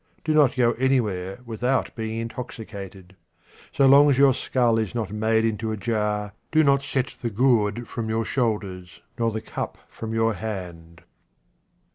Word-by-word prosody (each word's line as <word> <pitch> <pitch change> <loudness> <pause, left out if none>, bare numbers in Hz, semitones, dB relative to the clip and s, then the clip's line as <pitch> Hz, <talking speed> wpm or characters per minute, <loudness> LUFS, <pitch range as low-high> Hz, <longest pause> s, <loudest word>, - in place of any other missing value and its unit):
Do 155 - 0
not 145 -4 +4
go 120 -2 +3
anywhere 105 -7 0
without 125 +3 -1
being 110 -1 -4
intoxicated. 100 -5 -7 0.6
So 140 - +3
long 140 +2 +7
as 135 - +3
your 135 -1 +6
skull 120 -2 +1
is 110 0 -3
not 110 -5 -2
made 110 +1 +2
into 110 0 -1
a 110 - -3
jar, 105 -2 -1 0.2
do 155 0 +4
not 140 -1 +4
set 130 -1 -2
the 120 - -1
gourd 115 0 +1
from 115 -2 -4
your 110 0 0
shoulders 100 -7 -2 0.2
nor 115 0 +2
the 110 0 -4
cup - - -5
from 110 -1 -6
your 115 0 +1
hand. 90 -5 -7
115 Hz, 160 wpm, -24 LUFS, 105-125 Hz, 0.6 s, long